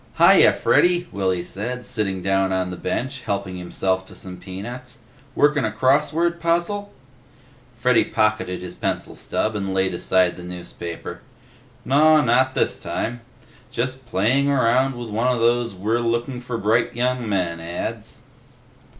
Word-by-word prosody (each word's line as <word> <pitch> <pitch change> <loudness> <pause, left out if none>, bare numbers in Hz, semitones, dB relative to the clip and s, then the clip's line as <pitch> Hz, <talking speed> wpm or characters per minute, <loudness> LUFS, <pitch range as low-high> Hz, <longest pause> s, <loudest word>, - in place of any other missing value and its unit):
"Hi - - +7
ya, - - +7
Freddy," 175 0 +2
Willy 95 -3 -1
said, 120 +8 -5
sitting 95 -4 -2
down 95 0 +1
on 95 -1 -1
the - - -5
bench 130 +8 -3
and 125 - -16
helping 100 -2 -2
himself 95 +1 -1
to - - -14
some 90 -1 -9
peanuts. 110 +8 -8 0.4
"Workin' 145 -1 +3
a 110 - +1
crossword 150 +8 +2
puzzle?" 175 +5 0 0.9
Freddy 125 0 +3
pocketed 110 -4 0
his 90 - -7
pencil - - -3
stub 110 0 -2
and 95 -2 -2
laid 95 -1 +1
aside 90 0 +2
the 90 - -9
newspaper. 85 -1 -7 0.6
"Naw, 155 +3 +5
not 130 +1 +2
this - - 0
time. 120 +1 -3 0.5
Just 130 +1 -3
playing 120 +7 +2
around 130 0 +2
with 120 -1 -6
one 115 +4 0
of 125 -2 +1
those 120 -1 +1
'We're 110 +5 0
looking 120 +2 -1
for 125 -1 -4
bright 115 +3 +1
young 125 -1 -1
men' 90 -4 -1
ads." 85 +1 -6
115 Hz, 150 wpm, -22 LUFS, 95-130 Hz, 0.9 s, Hi